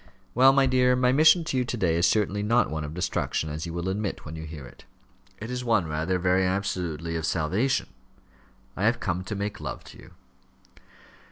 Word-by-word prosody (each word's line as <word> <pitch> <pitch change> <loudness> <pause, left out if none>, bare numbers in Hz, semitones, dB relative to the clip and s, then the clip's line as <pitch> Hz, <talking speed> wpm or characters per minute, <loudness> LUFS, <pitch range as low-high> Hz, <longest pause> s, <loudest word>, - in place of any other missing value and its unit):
"Well, 130 +2 +6
my 135 0 +3
dear, 125 -1 +3
my 125 0 +2
mission 155 +5 +5
to 150 -4 -2
you 125 - +2
to 125 0 -4
day 85 -6 +1
is 85 +1 +3
certainly 105 -1 +1
not 115 0 +2
one 80 0 -3
of 75 +2 -7
destruction, 90 -3 -2
as 80 +3 -5
you 85 - -6
will 85 +1 -3
admit 100 +1 -3
when 75 +1 -7
you 80 0 -7
hear 75 -4 -9
it. - - -15 0.5
It 110 +4 -7
is 125 0 -3
one, 110 -7 +2
rather, 80 +4 -1
very 90 +1 +2
absolutely 90 -4 -2
of 80 - -3
salvation. 95 - 0 0.9
I - - -1
have - - +2
come 90 +1 -2
to 105 +3 -5
make 100 +1 -4
love - - -6
to - - -14
you." - - -15
95 Hz, 205 wpm, -26 LUFS, 80-120 Hz, 0.9 s, Well